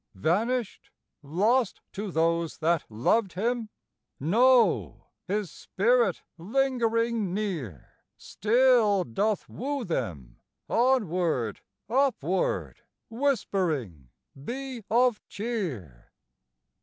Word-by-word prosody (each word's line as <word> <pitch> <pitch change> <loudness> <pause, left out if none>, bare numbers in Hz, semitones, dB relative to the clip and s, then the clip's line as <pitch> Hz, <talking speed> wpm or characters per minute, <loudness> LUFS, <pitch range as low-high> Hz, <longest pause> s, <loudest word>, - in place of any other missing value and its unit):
Vanished? 220 - -1 0.3
Lost 205 - +1
to 205 +1 -4
those 165 0 0
that 165 0 +1
loved 175 - +1
him? 230 +3 -1 0.5
No; 200 - +3 0.2
his 200 -3 -2
spirit 235 +2 +1 0.2
lingering 230 -2 0
near 160 - -5 0.2
Still 225 -3 +3
doth 205 - -1
woo 280 +2 -4
them, 85 - -4 0.3
onward, 180 - +1 0.3
upward, 280 - 0 0.3
Whispering, 175 - -1 0.3
"Be 255 - -5
of 240 0 +3
cheer." 165 - -5
210 Hz, 80 wpm, -27 LUFS, 160-240 Hz, 0.5 s, No